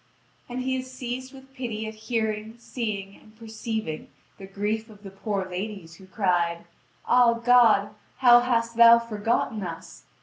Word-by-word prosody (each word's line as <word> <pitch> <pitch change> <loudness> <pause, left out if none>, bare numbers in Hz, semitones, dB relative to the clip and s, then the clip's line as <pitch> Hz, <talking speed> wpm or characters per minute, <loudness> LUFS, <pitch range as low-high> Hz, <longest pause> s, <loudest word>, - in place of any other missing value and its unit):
And 250 +1 -4
he 260 0 -1
is 255 0 -7
seized 255 0 -6
with 270 -1 -15
pity 235 -5 -4
at 220 - -6
hearing, 220 0 -3
seeing, 210 -5 -5
and 215 0 -21
perceiving 220 -6 -5 0.3
the 195 - -9
grief 210 +3 -3
of 210 -1 -16
the 195 - -9
poor 195 -1 -3
ladies, 185 -3 -6
who 190 - -16
cried: 175 -4 0 0.4
"Ah, 245 -1 +4
God, 230 -4 +4 0.3
how 240 -2 +7
hast 235 -1 -1
Thou 235 0 +9
forgotten 225 -1 -1
us! 170 -3 -8
220 Hz, 155 wpm, -25 LUFS, 200-240 Hz, 0.4 s, Thou